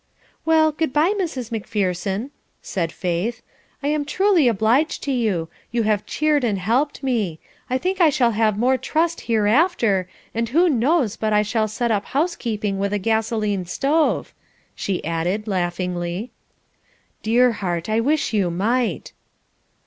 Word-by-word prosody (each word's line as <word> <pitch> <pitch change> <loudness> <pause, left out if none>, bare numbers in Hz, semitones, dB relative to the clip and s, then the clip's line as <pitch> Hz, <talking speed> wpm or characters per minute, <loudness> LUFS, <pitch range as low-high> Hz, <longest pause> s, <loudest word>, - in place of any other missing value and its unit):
"Well, 320 -1 +4
good 315 -1 -1
bye, 320 +7 +3
Mrs. 260 - -3
Macpherson," 205 +1 -2 0.3
said 170 -4 -2
Faith. 185 +8 -2 0.4
"I 285 - +1
am 300 0 0
truly 365 -1 +3
obliged 235 +8 +2
to 280 - -1
you. 210 -10 0 0.2
You 235 0 0
have 210 -1 0
cheered 300 -2 +1
and 215 -5 +1
helped 250 +10 0
me. 220 -11 0 0.3
I 255 - +1
think 370 +6 -1
I 330 - +7
shall 255 -5 +2
have 215 -2 +1
more 255 +4 +3
trust 325 +6 0
hereafter, 220 - +2 0.2
and 230 0 -1
who 340 +7 +4
knows 255 - +1
hut 215 -1 +1
I 210 0 +4
shall 215 +1 0
set 230 +2 -1
up 205 -2 0
housekeeping 230 - -1
with 200 +1 -1
a - - +2
gasoline 215 -2 0
stove," 295 - +1 0.4
she 195 -3 -3
added, 175 +6 -1
laughingly. 180 +2 -2 0.9
"Dear 240 +3 +4
heart, 175 -6 -3
I 220 +1 +1
wish 285 +2 +1
you 200 -4 +2
might." 210 - -1
225 Hz, 150 wpm, -22 LUFS, 200-280 Hz, 0.9 s, I